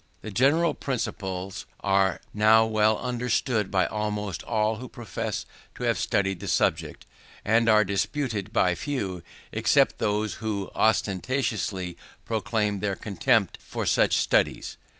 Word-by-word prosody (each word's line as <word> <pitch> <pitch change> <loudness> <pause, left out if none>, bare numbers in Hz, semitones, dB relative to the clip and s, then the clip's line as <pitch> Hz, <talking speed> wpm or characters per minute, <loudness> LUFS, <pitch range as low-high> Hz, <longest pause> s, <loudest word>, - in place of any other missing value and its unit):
These 110 - -7
general 150 +8 +3
principles 95 -7 -4
are 95 -3 +2
now 110 +1 +5
well 110 -1 +2
understood 125 -3 -1
by 95 -1 +2
almost 105 -3 -3
all 110 -1 0
who 125 +1 -8
profess 120 -3 -4 0.3
to - - -7
have 115 -1 +1
studied 95 -4 0
the - - -7
subject, - - 0 0.4
and 115 +2 +3
are 105 -1 +5
disputed 105 +1 -2
by 90 -5 +3
few 95 -7 -3 0.3
except - - +2
those 105 -1 0
who 100 -3 -3
ostentatiously 105 -3 0 0.3
proclaim 110 -2 -1
their 100 -1 -1
contempt 110 0 +1
for - - -5
such - - +3
studies. - - +1
105 Hz, 130 wpm, -26 LUFS, 100-115 Hz, 0.4 s, now